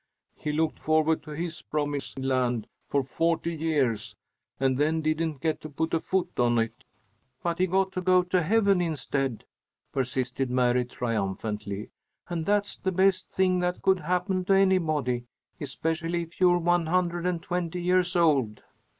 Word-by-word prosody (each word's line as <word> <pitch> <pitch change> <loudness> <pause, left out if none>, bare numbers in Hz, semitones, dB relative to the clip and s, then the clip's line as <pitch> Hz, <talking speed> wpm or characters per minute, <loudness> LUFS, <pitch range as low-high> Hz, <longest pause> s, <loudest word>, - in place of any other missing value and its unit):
He 150 - -3
looked 155 +1 0
forward 155 0 +2
to 155 - -13
his 160 +1 -4
promised 145 -2 -3
land 130 -4 0 0.2
for 140 -1 +1
forty 165 +5 0
years, 145 -9 0 0.4
and 135 0 +2
then 155 +2 +1
didn't 155 -2 -1
get 160 -2 -1
to 155 - -7
put 160 +3 -2
foot 190 -7 -1
on 120 -1 +3
it." 115 0 -2 0.6
"But 170 0 -1
he 185 - +3
got 190 +1 +1
to 185 - -3
go 185 0 +4
to 180 0 +1
heaven 200 +1 +3
instead," 140 -7 -2 0.5
persisted 130 0 -1
Mary, 125 0 +2
triumphantly, 105 -3 -3 0.4
"and 170 -2 -3
that's 205 0 +1
the 190 - -1
best 185 0 +2
thing 185 -1 +2
that 180 0 -1
could 190 -1 +4
happen 180 +1 0
to 195 - +3
anybody, 155 -11 +2 0.3
especially 165 +1 -2
if 165 +2 -14
you're 175 -1 +6
one 175 -1 +2
hundred 175 0 +1
and 170 -2 -1
twenty 180 -1 -2
years 180 0 +2
old." 140 -11 +2
160 Hz, 155 wpm, -27 LUFS, 135-180 Hz, 0.6 s, you're